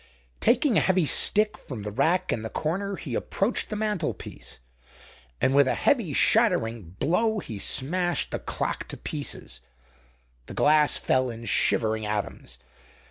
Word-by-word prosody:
Taking 240 0 +3
a - - +5
heavy 185 -3 +2
stick 210 +9 +3
from 120 -7 -8
the 105 - -5
rack 170 - +1
in 110 - -3
the 110 - -5
corner 195 - -3
he - - -7
approached 205 +5 -2
the 215 - -4
mantlepiece, 210 -6 -4 0.8
and 130 - +2
with 140 -1 +5
a - - +1
heavy 230 - +1
shattering 115 - +1
blow 220 - +1
he 110 - -6
smashed 175 - +2
the - - -3
clock - - -3
to - - -7
pieces. - - -4 0.9
The - - -9
glass 150 0 +4
fell 130 -1 +1
in 115 0 -8
shivering 110 -1 0
atoms. 105 -1 -5
155 Hz, 145 wpm, -26 LUFS, -, 0.9 s, a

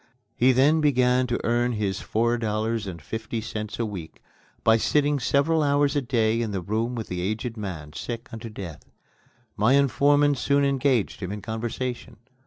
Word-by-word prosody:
He 125 +3 +4
then 145 +5 +4
began 125 -3 +3
to 120 - -1
earn 120 +1 +1
his 100 -3 -2
four 120 +2 0
dollars 110 0 -1
and 85 -3 -6
fifty 110 +7 -5
cents 110 -1 -5
a 115 - -1
week 95 -7 -7 0.4
by 110 0 +5
sitting 145 +4 +2
several 140 +6 +2
hours 145 0 +2
a 145 - +2
day 115 -3 +1
in 115 - -1
the 100 -3 -3
room 110 +6 -1
with 115 -2 -4
the 90 -1 -4
aged 110 +5 -3
man, 85 -9 -6
sick 120 +2 -5
unto 115 +1 -6
death. 95 -7 -8 0.7
My 110 +6 +3
informant 140 +1 +3
soon 140 +1 +2
engaged 135 -5 +1
him 90 -1 -4
in 105 -1 -6
conversation. 115 +1 -4
115 Hz, 175 wpm, -25 LUFS, 110-135 Hz, 0.7 s, by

